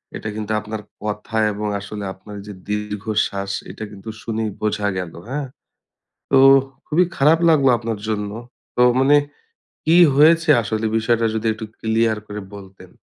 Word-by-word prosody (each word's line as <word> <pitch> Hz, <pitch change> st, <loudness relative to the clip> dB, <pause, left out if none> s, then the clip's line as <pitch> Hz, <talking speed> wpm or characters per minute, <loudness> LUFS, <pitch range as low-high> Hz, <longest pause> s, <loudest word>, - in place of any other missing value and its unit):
এইটা 110 Hz, -, -5 dB
কিন্তু 110 Hz, 0 st, -4 dB
আপনার 105 Hz, 0 st, -6 dB, 0.2 s
কথা 105 Hz, +1 st, -4 dB, 0.2 s
এবং 105 Hz, +1 st, -3 dB
আসলে 100 Hz, +1 st, -7 dB
আপনার 105 Hz, +2 st, -11 dB
যে 105 Hz, -, -7 dB, 0.2 s
দীর্ঘশ্বাস 105 Hz, -1 st, -2 dB, 0.2 s
এইটা 110 Hz, -, -7 dB
কিন্তু 100 Hz, +2 st, -10 dB
শুনেই 110 Hz, -1 st, -2 dB
বোঝা 105 Hz, -1 st, 0 dB
গেল, 90 Hz, -3 st, -4 dB, 0.2 s
হ্যাঁ? 140 Hz, 0 st, -3 dB, 0.8 s
তো 135 Hz, -, +5 dB, 0.5 s
খুবই 175 Hz, +4 st, +3 dB
খারাপ 155 Hz, +4 st, +4 dB
লাগলো 140 Hz, -5 st, +5 dB
আপনার 115 Hz, -2 st, -4 dB
জন্য। 105 Hz, -1 st, -2 dB, 0.5 s
তো 125 Hz, -, +4 dB, 0.2 s
মানে 145 Hz, +2 st, +5 dB, 0.7 s
কি 165 Hz, +2 st, +5 dB, 0.2 s
হয়েছে 160 Hz, +2 st, +5 dB
আসলে 110 Hz, +1 st, -2 dB
বিষয়টা 115 Hz, +1 st, +1 dB
যদি 110 Hz, 0 st, -3 dB
একটু 110 Hz, 0 st, -7 dB
ক্লিয়ার 110 Hz, 0 st, +1 dB
করে 105 Hz, 0 st, -6 dB
বলতেন? 95 Hz, -2 st, -13 dB
110 Hz, 145 wpm, -21 LUFS, 105-120 Hz, 0.8 s, তো